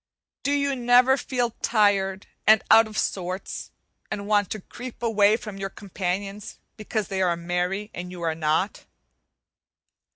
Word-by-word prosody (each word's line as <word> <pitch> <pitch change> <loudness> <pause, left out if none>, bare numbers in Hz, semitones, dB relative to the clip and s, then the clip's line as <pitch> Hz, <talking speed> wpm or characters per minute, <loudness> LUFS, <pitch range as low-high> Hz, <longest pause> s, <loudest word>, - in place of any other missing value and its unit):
Do 280 - -1
you 280 -1 +1
never 250 +1 +5
feel 245 -3 -1
tired 200 -3 +2 0.2
and 220 -1 +6
"out 225 0 +8
of 215 0 -8
sorts," 185 0 -3 0.4
and 200 - -4
want 205 -2 +2
to 215 - -4
creep 245 +4 -10
away 215 -2 +4
from 210 -4 -8
your 195 0 -4
companions, 195 +1 -4 0.2
because 215 -1 -3
they 190 -1 -1
are 175 -2 +2
merry 180 +4 -2
and 180 +1 -6
you 180 -1 -8
are 165 -1 +1
not? 160 +5 -1
205 Hz, 150 wpm, -25 LUFS, 185-225 Hz, 0.4 s, out